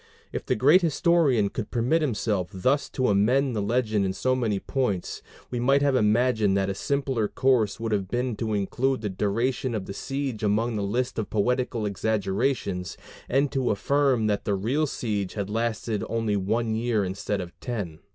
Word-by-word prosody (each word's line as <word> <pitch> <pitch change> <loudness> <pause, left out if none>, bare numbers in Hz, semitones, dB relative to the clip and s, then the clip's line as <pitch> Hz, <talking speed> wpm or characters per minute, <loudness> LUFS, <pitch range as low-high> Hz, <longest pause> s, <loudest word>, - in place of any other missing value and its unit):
If - - -5
the - - +2
great 145 - +5
historian 155 - +3
could 110 0 -5
permit 125 +7 +1
himself 105 - -1
thus 130 +10 0
to 130 - 0
amend 120 +6 +2
the 105 - 0
legend 110 -1 +1
in 95 -1 -1
so 130 +6 +1
many 115 -5 0
points, 115 -9 -2 0.3
we 120 - -2
might 135 +3 +3
have 140 -2 +3
imagined 110 -3 +3
that 100 0 0
a - - -2
simpler 135 -2 -1
course 125 -5 +1
would 115 -1 -3
have 100 -3 0
been 125 +2 -1
to 110 -2 -1
include 125 +6 0
the 105 - -2
duration 115 +6 -1
of 100 -3 -3
the 100 - -6
siege 135 -1 -4
among 110 +2 +1
the 105 - -1
list 120 +5 -1
of 110 - -3
poetical 120 +1 0
exaggerations 100 -1 -1 0.3
and 135 +2 +2
to 130 -2 0
affirm 130 +3 +2
that 105 -1 0
the 100 - 0
real 130 +11 0
siege 105 -8 -3
had 100 -1 -3
lasted 115 -1 -1
only 115 -2 0
one 110 +4 0
year 110 -2 0
instead 100 +2 -3
of 90 -2 -6
ten. 100 -11 -4
115 Hz, 180 wpm, -26 LUFS, 100-130 Hz, 0.3 s, great